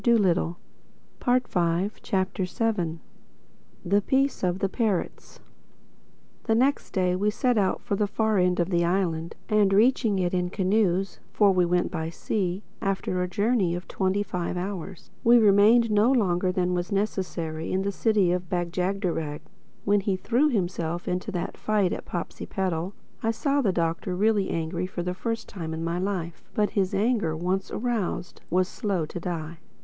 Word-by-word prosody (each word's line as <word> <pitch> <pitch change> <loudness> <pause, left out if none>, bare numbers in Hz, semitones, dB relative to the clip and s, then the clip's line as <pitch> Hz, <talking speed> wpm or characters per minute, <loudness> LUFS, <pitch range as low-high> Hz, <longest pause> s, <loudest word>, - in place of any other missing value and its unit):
THE 185 -7 +3 0.9
SEVENTH 175 +2 0
CHAPTER 190 -1 -1 1.4
THE 200 +3 +3
PEACE 270 +3 +1
OF 180 0 +1
THE 195 - 0
PARROTS 210 -5 -2 1.1
THE 225 - +2
next 265 +5 +2
day 180 -1 +1
we 205 +3 +1
set 245 +3 +1
out 195 -3 +1
for 200 - -1
the 205 +1 +1
far 215 0 +1
end 180 0 +2
of 175 +2 0
the 170 -1 +2
island, 170 -2 0
and 210 -2 +3
reaching 220 0 +3
it 180 -1 0
in 180 -1 0
canoes 195 -1 +1
(for 205 -2 +4
we 180 -1 +3
went 175 +1 +1
by 160 -3 -3
sea) 185 +2 -2 0.2
after 190 -2 -1
a 180 - 0
journey 200 -1 +1
of 175 - -7
twenty 190 +1 0
five 180 -2 -3
hours, 185 -1 -6
we 235 +1 +7
remained 220 +2 +5
no 210 +4 +4
longer 185 -7 +2
than 180 -1 0
was 175 +2 -2
necessary 180 -6 -2
in 190 +1 0
the 200 - -1
City 205 -3 +2
of 180 -1 -2
Bag 175 -1 -1
jagderag. 180 -5 -2 0.4
When 205 +1 +4
he 195 -1 0
threw 245 +10 +2
himself 175 - -2
into 180 +4 -2
that 175 - -3
fight 205 -4 +1
at - - -6
Popsipetel, 180 +1 -3 0.3
I 225 - 0
saw 280 +5 +1
the 210 -7 +2
Doctor 170 +1 -1
really 205 0 +2
angry 170 +2 -2
for 175 -2 -4
the 180 +1 -2
first 230 +5 -3
time 165 -6 -5
in 160 - -4
my 170 +1 -1
life. 180 -3 -3
But 210 -1 +2
his 190 -3 0
anger, 205 -7 +1
once 185 +3 -1
aroused, 220 -7 -3
was 185 +2 +2
slow 195 -6 -2
to 165 - -6
die. 165 -2 -5
190 Hz, 165 wpm, -26 LUFS, 175-210 Hz, 1.4 s, we